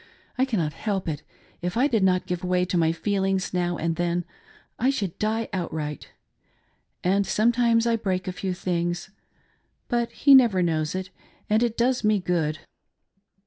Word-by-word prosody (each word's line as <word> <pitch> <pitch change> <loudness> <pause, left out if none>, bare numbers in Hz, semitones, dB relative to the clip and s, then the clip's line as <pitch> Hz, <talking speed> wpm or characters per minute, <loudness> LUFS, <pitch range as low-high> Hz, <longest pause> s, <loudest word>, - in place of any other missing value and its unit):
I 260 - +2
cannot 175 - -1
help 200 -4 -3
it; 150 -2 -3 0.4
if 180 +4 -3
I 255 - +4
did 230 -8 +2
not 185 -1 +2
give 180 -1 -3
way 180 0 +1
to 180 - -3
my 165 -2 +3
feelings 195 +1 -1
now 175 -1 0
and 165 0 -1
then 175 0 0 0.5
I 255 - +3
should 205 -11 -2
die 220 +1 0
outright; 155 -5 -4 0.5
— - - -44
and 195 +3 +3
some 225 +3 +3
times 235 -1 +2
I 230 -1 +2
break 185 -4 -2
a - - -1
few 185 0 -3
things, 175 0 -2 0.4
— - - -43
but 240 -1 0
he 280 - +5
never 230 -9 +6
knows 160 -1 0
it, 185 0 -4 0.4
and 215 +1 +4
it 235 -2 0
does 245 +1 +1
me 215 0 +3
good. 165 -4 -1
185 Hz, 180 wpm, -25 LUFS, 175-225 Hz, 0.5 s, never